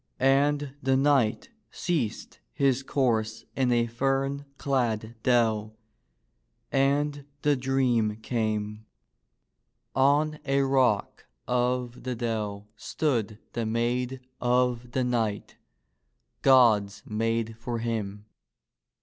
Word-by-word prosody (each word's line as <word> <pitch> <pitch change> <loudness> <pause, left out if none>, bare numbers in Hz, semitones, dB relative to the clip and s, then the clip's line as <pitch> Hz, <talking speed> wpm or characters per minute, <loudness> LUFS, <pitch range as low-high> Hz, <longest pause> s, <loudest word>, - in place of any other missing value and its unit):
And 140 +1 +2
the 130 -1 +2
knight 135 - +2 0.2
ceased 155 - -3
his 135 -2 +2
course 115 -5 0
in 130 -2 +2
a 120 -1 +3
fern 135 +4 -1
clad 115 -5 -1
dell 110 -3 +1 0.9
and 145 +1 +1 0.2
the 145 -1 +4
dream 125 -5 +1
came. 110 -1 -3 1.1
On 145 +3 +3
a 140 0 +1
rock 130 -6 +1 0.2
of 125 0 0
the 125 -1 -3
dell 105 -3 -3
stood 115 -3 -1 0.2
the 115 -2 -2
maid 120 +3 -1 0.2
of 125 -1 +1
the 130 - +1
knight 115 -4 -2 0.4
— - - -49
God^s 110 -6 +4
maid 115 +1 -1
for 120 0 -3
him. 105 -3 -3
120 Hz, 100 wpm, -27 LUFS, 110-135 Hz, 1.1 s, the